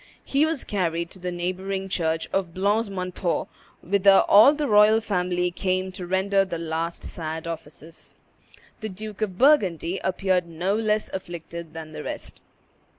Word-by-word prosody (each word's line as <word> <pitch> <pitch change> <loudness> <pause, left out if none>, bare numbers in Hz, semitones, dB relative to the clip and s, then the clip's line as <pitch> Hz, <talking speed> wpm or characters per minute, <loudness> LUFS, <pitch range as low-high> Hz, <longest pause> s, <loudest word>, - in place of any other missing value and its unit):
He 285 +3 +2
was 320 -4 -2
carried 170 -4 -2
to 190 - -14
the 180 0 -4
neighboring 190 +2 -3
church 165 -3 -1
of 180 -4 -1
Blancs 205 +3 +1
Manteaux, 185 -2 -2 0.4
whither 195 +1 +5
all 215 +7 +8
the 295 -1 -1
royal 210 +1 +6
family 180 -4 -1
came 185 +1 -1
to 185 -1 -7
render 195 +2 +2
the 185 -3 -4
last 165 +1 -3
sad 160 -1 -5
offices. 160 -1 -9 0.6
The 220 - -5
Duke 210 +2 -8
of 190 -4 -2
Burgundy 195 - +3
appeared 185 -1 +1
no 175 +4 -1
less 215 -1 0
afflicted 170 -3 -7
than 160 -1 -7
the - - -7
rest. - - -6
185 Hz, 150 wpm, -25 LUFS, 170-200 Hz, 0.6 s, all